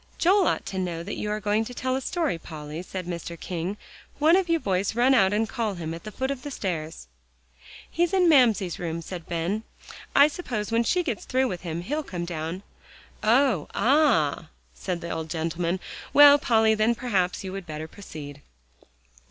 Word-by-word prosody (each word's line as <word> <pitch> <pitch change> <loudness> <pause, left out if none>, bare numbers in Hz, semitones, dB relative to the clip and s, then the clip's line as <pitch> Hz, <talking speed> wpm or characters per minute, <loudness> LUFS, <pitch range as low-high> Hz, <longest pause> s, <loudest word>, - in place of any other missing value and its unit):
"Joel 375 +2 +4
ought - - 0
to 190 - -4
know 170 -2 -3
that - - -5
you 210 - -3
are 210 0 -1
going 210 +1 +1
to 245 +2 -8
tell 255 +1 -1
a 265 - -2
story, 315 - -1
Polly," 155 0 -7
said 185 0 -6
Mr. 170 -1 -6
King. 180 +3 -4 0.4
"One 315 +3 +5
of 375 -2 +1
you 335 0 +3
boys 195 -2 -1
run 250 +3 +4
out 195 -7 +4
and 220 +2 +1
call 225 -5 -2
him 165 -2 -5
at 165 - -9
the 215 - -6
foot 265 +5 -2
of 275 -2 -4
the 290 - -6
stairs." 165 - -4 0.8
"He's 345 0 0
in 370 -2 +3
Mamsie's 230 - +4
room," 170 -1 -4
said 175 -1 -8
Ben. 175 +5 -1 0.5
"I 280 - +8
suppose 240 - -4
when 230 +1 +3
she 355 +8 +2
gets 240 - -3
through 260 +1 +1
with 180 -4 -5
him, 170 -1 -4
he'll 295 - -2
come 175 - -5
down." 170 +2 -5 0.6
"Oh! 230 - +3
ah!" 230 - +2 0.2
said 180 -2 -4
the 170 - -5
old 160 -1 -4
gentleman. 170 +2 -2 0.3
"Well, 290 0 +9
Polly, 225 -5 +3
then 220 +2 +2
perhaps 195 -8 -1
you 190 - -5
would 195 -2 -7
better 155 0 -5
proceed." 150 -6 -10
200 Hz, 195 wpm, -26 LUFS, 170-255 Hz, 0.8 s, Well